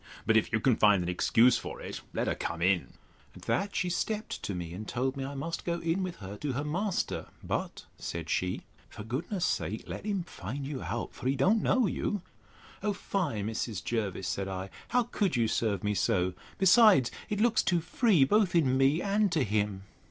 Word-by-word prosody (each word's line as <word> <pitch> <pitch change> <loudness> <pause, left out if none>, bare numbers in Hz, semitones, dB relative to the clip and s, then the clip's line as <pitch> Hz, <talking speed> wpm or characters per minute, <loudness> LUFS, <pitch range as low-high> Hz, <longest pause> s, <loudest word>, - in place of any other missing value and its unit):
But 110 - +3
if 110 - +3
you 115 - +2
can 120 +1 +3
find 105 -4 +5
an 85 - -3
excuse 115 +7 +4
for - - -7
it, - - -6
let - - -1
her - - +1
come 85 - -4
in. 90 0 +1 0.4
At - - -13
that 200 +1 -1
she 180 -2 0
stept 215 +4 -2
to 100 - -3
me, 85 -2 -5
and 105 +4 -7
told 130 +2 -1
me, 135 - -4
I 140 +1 -5
must 165 +5 -4
go 170 -1 -1
in 165 +3 -1
with 185 -2 -3
her 100 +1 -8
to 145 +1 -3
her 140 +3 -2
master; 180 +6 -2 0.2
but, - - -3
said 85 -1 -5
she, 90 +3 -1 0.3
for 105 - -9
goodness' 165 - -2
sake, 110 +4 -1
let - - -6
him 200 -3 -1
find 135 - -6
you 140 -2 -4
out; 120 0 -4
for - - -5
he 135 - +2
don't 210 +9 +3
know 255 -2 +3
you. 205 -1 -2 0.6
O 210 -1 0
fie, 165 - -2
Mrs. 110 -2 -3
Jervis, 100 -5 -2
said 95 0 -2
I, 95 0 -5 0.2
how 245 0 +2
could 210 -5 -1
you 115 -2 +2
serve 110 -2 0
me 105 0 +1
so? 95 -4 +1 0.2
Besides, 190 - +6 0.2
it 210 - -1
looks 230 0 +4
too 175 -1 +2
free 175 - +3
both 200 +4 +3
in 135 -6 +3
me, 140 +5 +3
and 205 0 +2
to 155 - +2
him. 105 -3 -1
135 Hz, 210 wpm, -30 LUFS, -, 0.6 s, Besides